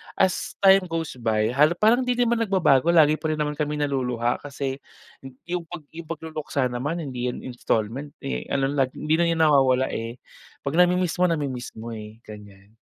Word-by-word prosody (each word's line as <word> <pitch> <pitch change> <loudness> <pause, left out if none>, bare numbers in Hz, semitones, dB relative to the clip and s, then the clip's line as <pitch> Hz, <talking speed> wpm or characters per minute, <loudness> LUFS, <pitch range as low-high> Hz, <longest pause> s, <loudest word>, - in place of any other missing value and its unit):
as 190 -1 0
time 190 -1 +6
goes 165 -6 -4
by, 110 0 +1
hal 150 +6 +4
parang 220 +6 +4
hindi 250 -1 0
din 245 - +2
naman 235 -1 +1
nag-babago 165 -7 +3
lagi 155 -2 +5
pa 160 - -3
rin - - -1
naman 150 0 -1
kami 150 0 -1
naluluha 125 -5 -1
kasi, 140 -1 -5 0.7
'yong 175 -2 -3
pag 175 -2 -8
'yong 165 -1 -9
pag-luluksa 155 -4 -3
naman 150 +7 -3
hindi 125 -3 -4
'yan 125 - -5
installment, 125 +2 -3
eh, 135 - -4
ano 135 0 0
like 135 -3 0
hindi 155 +1 0
na 170 - +4
'yan 165 -1 0
nawawala, 135 -3 +4
eh, 115 +1 -4 0.5
'pag 140 +4 -2
nami-miss 180 0 +2
mo, 180 - +5
nami-miss 140 -7 -3
mo, 115 +1 -7
eh, 110 0 -8
ganyan. 105 -1 -13
145 Hz, 185 wpm, -24 LUFS, 125-165 Hz, 0.7 s, time